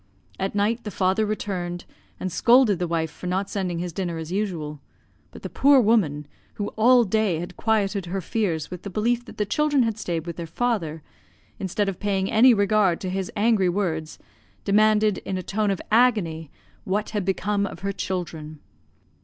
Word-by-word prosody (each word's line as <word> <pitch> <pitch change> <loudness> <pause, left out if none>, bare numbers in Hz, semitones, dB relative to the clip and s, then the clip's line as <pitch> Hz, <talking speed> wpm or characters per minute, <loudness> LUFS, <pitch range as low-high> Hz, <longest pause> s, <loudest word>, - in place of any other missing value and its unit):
At 195 +1 -2
night 220 +4 +1
the 210 - -4
father 195 +2 +1
returned, 180 -4 -4 0.3
and 185 - -3
scolded 235 -2 +4
the 175 - -1
wife 165 -2 -1
for 180 - -8
not 190 +2 -1
sending 185 -4 -2
his 175 0 -4
dinner 175 -2 -3
as 160 +1 -6
usual; 170 -7 -3 0.5
but - - -13
the - - -3
poor 280 0 +5
woman 200 - +2 0.3
(who 205 - -3
all 245 +2 +5
day 215 -4 +1
had 175 +2 -6
quieted 205 -4 0
her 190 +3 -2
fears 175 -5 -2
with 180 -1 -6
the 200 - -6
belief 235 +5 0
that - - -12
the 210 - 0
children 290 +4 +2
had 225 -2 -2
stayed 170 -5 -3
with 170 -2 -6
their 170 -1 -5
father), 165 -7 -2 0.6
instead 195 +2 -1
of 195 -3 -3
paying 195 -2 -1
any 240 +4 +7
regard 205 -4 +2
to 185 - -3
his 190 0 -3
angry 205 -3 +3
words, 165 -5 -2 0.5
demanded, 215 0 +3
in 190 - -4
a 185 - -4
tone 210 +3 -1
of 195 - -1
agony, 205 - +2 0.3
what 205 +3 -2
had 210 -3 -1
become 200 +2 0
of - - -10
her 200 - -1
children? 165 -5 -5
195 Hz, 185 wpm, -24 LUFS, 175-215 Hz, 0.6 s, any